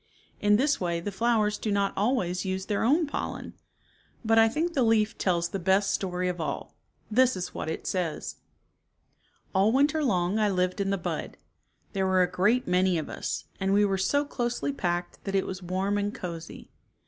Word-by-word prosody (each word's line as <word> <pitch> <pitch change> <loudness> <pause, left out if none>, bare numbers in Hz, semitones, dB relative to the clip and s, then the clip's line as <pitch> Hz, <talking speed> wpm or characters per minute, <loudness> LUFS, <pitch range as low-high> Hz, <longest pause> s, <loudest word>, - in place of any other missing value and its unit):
In 205 0 +4
this 275 +3 +2
way 170 -2 0
the 205 +4 -4
flowers 215 0 +1
do 215 - -2
not 200 -1 +1
always 195 -5 0
use 190 0 -3
their 205 -1 -1
own 300 +8 +3
pollen. 290 - -5 0.7
But 225 +1 +5
I 225 0 +6
think 330 +7 -1
the 275 - +1
leaf 225 -2 +3
tells 170 -2 0
the 195 - -3
best 190 +2 +2
story 180 -1 -1
of 180 -2 -2
all. 145 -3 -4 0.4
This 255 +2 +4
is 185 - -5
what - - -4
it 160 - -5
says: 175 -5 -2 1.2
"All 195 +3 +4
winter 290 +4 +2
long 185 -4 +1
I 210 -1 +3
lived 185 0 0
in 195 - 0
the 195 - +1
bud. 175 - -4 0.6
There 190 -2 0
were 185 -1 +4
a 180 - -1
great 210 +7 +2
many 180 0 +3
of 155 - -4
us, - - -4
and 195 0 +1
we 205 +1 +5
were 195 -1 0
so 285 +9 +2
closely 245 +1 -2
packed 175 -7 -3
that 195 -1 -2
it 190 - +2
was 190 0 -5
warm 190 +3 -1
and 205 0 -1
cozy. 170 -5 -8
195 Hz, 195 wpm, -27 LUFS, 180-225 Hz, 1.2 s, I